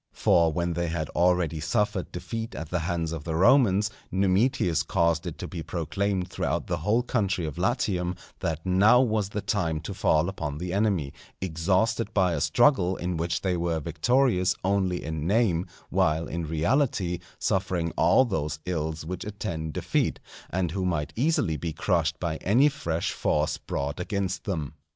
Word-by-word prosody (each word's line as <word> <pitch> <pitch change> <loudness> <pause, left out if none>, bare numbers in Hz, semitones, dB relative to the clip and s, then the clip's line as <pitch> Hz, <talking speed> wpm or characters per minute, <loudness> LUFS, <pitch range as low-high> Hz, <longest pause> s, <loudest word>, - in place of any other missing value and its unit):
For 85 -2 +3
when 85 +2 -1
they 85 +1 -1
had 80 -2 -3
already 85 -2 +1
suffered 105 +2 -1
defeat 115 +5 -5
at 80 0 -6
the 90 - +1
hands 85 -1 -2
of 80 -3 -5
the 80 -2 -3
Romans, 105 +1 +4 0.2
Numitius 95 - +2
caused 85 -1 +1
it - - -5
to - - -5
be 85 - -6
proclaimed 95 +3 -2
throughout - - -2
the - - -2
whole 110 +4 +1
country 100 -8 0
of 75 - -5
Latium, 90 -2 0 0.2
that 80 +1 -3
now 100 +6 +5
was 110 -5 +1
the 105 +1 -3
time 95 -6 -1
to - - -6
fall 80 +2 +2
upon 75 -7 -4
the 90 +2 -4
enemy, 95 -9 0 0.3
exhausted 95 +6 0
by 95 -3 +3
a 75 - -2
struggle 120 -9 +3
in 90 0 -3
which 85 0 -1
they 95 -2 0
were 85 -1 -1
victorious 90 - +2
only 95 -2 0
in 80 0 -3
name, 95 -5 +2 0.2
while 80 +2 +2
in 85 -1 -4
reality 90 - +1 0.2
suffering 90 -3 -1
all 130 - +5
those 80 - -2
ills 80 -3 -3
which 90 +2 -5
attend 95 -7 -4
defeat, - - 0 0.3
and 90 -2 -1
who 95 +1 -2
might 85 -5 -1
easily 120 - +1
be 80 -1 -4
crushed 80 -1 0
by 80 -3 -2
any 125 +10 +4
fresh 85 - -2
force 75 0 0
brought 70 +4 -3
against 95 0 -2
them. 80 -7 -3
90 Hz, 170 wpm, -27 LUFS, 80-100 Hz, 0.3 s, now